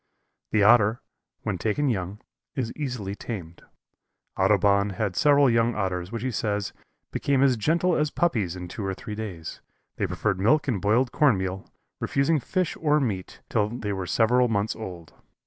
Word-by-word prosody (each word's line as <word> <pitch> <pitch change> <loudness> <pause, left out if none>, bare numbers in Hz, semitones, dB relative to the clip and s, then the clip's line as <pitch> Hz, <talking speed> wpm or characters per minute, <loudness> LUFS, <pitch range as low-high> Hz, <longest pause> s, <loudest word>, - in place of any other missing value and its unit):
The 105 - +2
Otter, 110 +1 +5 0.4
when - - -2
taken 130 +7 0
young, 100 -3 -2 0.3
is 120 -4 -2
easily 125 -10 -4
tamed. 90 -6 -7 0.7
Audubon 100 +1 +3
had 100 -1 -2
several 145 +5 +5
young 115 -1 +2
Otters 90 -2 -2
which 115 -1 -4
he 130 - -1
says 105 -2 -2 0.4
"became 140 -1 +1
as 135 -2 +4
gentle 165 - +1
as 150 0 +1
Puppies 110 - 0
in 90 -1 -7
two 100 - -6
or 95 -1 -2
three 105 - -7
days. 100 -7 -6 0.4
They - - 0
preferred 95 - -1
milk 145 +9 +3
and 110 -9 0
boiled 120 +5 +2
corn 140 -6 +4
meal, 95 +1 -4 0.3
refusing 145 +3 +1
fish 185 +6 -1
or 150 -1 +3
meat 100 -9 -3
till 105 -1 +1
they 110 -3 -4
were 95 -2 -4
several 125 +4 +3
months 105 -1 0
old." 90 -7 -8
110 Hz, 165 wpm, -26 LUFS, 95-130 Hz, 0.7 s, Otter